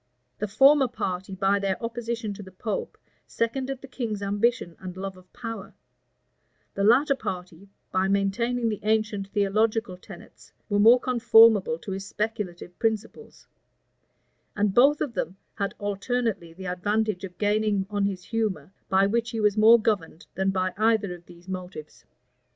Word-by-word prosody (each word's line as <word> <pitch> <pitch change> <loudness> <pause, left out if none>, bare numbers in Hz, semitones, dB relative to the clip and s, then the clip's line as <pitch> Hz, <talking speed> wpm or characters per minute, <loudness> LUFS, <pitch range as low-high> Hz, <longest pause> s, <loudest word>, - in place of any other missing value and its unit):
The 210 - -1
former 270 +6 +5
party, 190 -5 -4
by 195 +2 +2
their 195 -1 -1
opposition 230 -2 -4
to 200 - -9
the 190 - -11
pope, 200 +2 -4 0.3
seconded 260 +3 -2
the - - -8
king's 225 -6 -4
ambition 205 -2 0
and 185 -1 -8
love 195 0 -5
of 185 0 -19
power: 225 -1 -7 1.0
the 200 - -2
latter 265 +7 +5
party, 190 -5 -7 0.2
by 185 +1 +1
maintaining 230 +5 0
the 210 - -3
ancient 215 -2 0
theological 210 0 0
tenets, - - -14 0.2
were 205 -1 +1
more 230 +4 +7
conformable 225 -7 +5
to 195 - -8
his 190 0 -4
speculative 205 -6 -4
principles: 225 - -3 1.1
and 205 -1 +1
both 280 +6 +5
of 260 - -2
them 185 -2 -3 0.2
had 200 -2 -3
alternately 205 -2 -2
the 190 +3 -10
advantage 205 +2 -1
of 180 -2 -8
gaining 210 -1 +1
on 205 -1 0
his 190 -3 -3
humor, 195 -8 -3 0.2
by 195 0 +4
which 230 +3 0
he 225 - -4
was 210 -1 +2
more 225 +2 +7
governed 195 -7 -2
than 190 0 0
by 185 -1 -1
either 215 -3 +2
of 175 -1 -13
these 175 0 -16
motives. 180 -4 -8
205 Hz, 155 wpm, -26 LUFS, 190-225 Hz, 1.1 s, more